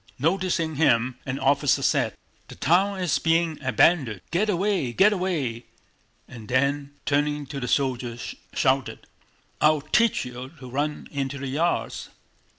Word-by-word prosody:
Noticing 165 Hz, 0 st, 0 dB
him, 125 Hz, -5 st, +2 dB
an 130 Hz, +1 st, -2 dB
officer 140 Hz, 0 st, +2 dB
said: -, -, +1 dB, 0.3 s
"The -, -, -11 dB
town 190 Hz, +4 st, +2 dB
is 155 Hz, -6 st, +1 dB
being 165 Hz, 0 st, +1 dB
abandoned. 130 Hz, -, +2 dB
Get 205 Hz, +5 st, +1 dB
away, 190 Hz, -9 st, 0 dB
get 210 Hz, -, +5 dB
away!" 150 Hz, -, -2 dB, 0.6 s
and 115 Hz, -3 st, -11 dB
then, 140 Hz, +3 st, 0 dB
turning 145 Hz, 0 st, 0 dB
to 140 Hz, +1 st, -6 dB
the 125 Hz, -, -4 dB
soldiers, 125 Hz, -4 st, -1 dB, 0.2 s
shouted: 130 Hz, -1 st, 0 dB, 0.6 s
"I'll 150 Hz, -1 st, +4 dB
teach 225 Hz, -, +2 dB
you 125 Hz, +3 st, -8 dB
to 130 Hz, -, -9 dB
run 145 Hz, +4 st, -3 dB
into 140 Hz, -1 st, -3 dB
the 140 Hz, -1 st, -5 dB
yards!" 160 Hz, +6 st, -1 dB
145 Hz, 140 wpm, -25 LUFS, 130-170 Hz, 0.6 s, get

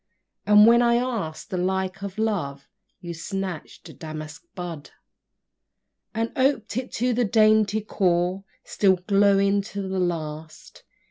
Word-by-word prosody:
And 210 Hz, 0 st, +8 dB
when 235 Hz, +1 st, +6 dB
I 235 Hz, -1 st, +3 dB
ask'd 225 Hz, -11 st, -3 dB
the 185 Hz, -, -1 dB
like 190 Hz, +1 st, -1 dB
of 200 Hz, 0 st, -6 dB
Love, 170 Hz, -11 st, -2 dB, 0.3 s
You 175 Hz, -1 st, -6 dB
snatched 185 Hz, 0 st, -6 dB
a -, -, -11 dB
damask 155 Hz, -, -8 dB
bud; 175 Hz, -5 st, -7 dB, 1.3 s
And 225 Hz, +1 st, -1 dB
oped 260 Hz, -5 st, +1 dB
it 255 Hz, +1 st, -3 dB
to 250 Hz, +1 st, 0 dB
the 245 Hz, +1 st, +1 dB
dainty 215 Hz, -1 st, +3 dB
core, 185 Hz, -2 st, 0 dB, 0.2 s
Still 195 Hz, -2 st, +2 dB
glowing 200 Hz, 0 st, +3 dB
to 195 Hz, 0 st, -6 dB
the 190 Hz, 0 st, -2 dB
last. 155 Hz, -3 st, -5 dB
195 Hz, 135 wpm, -24 LUFS, 175-215 Hz, 1.3 s, And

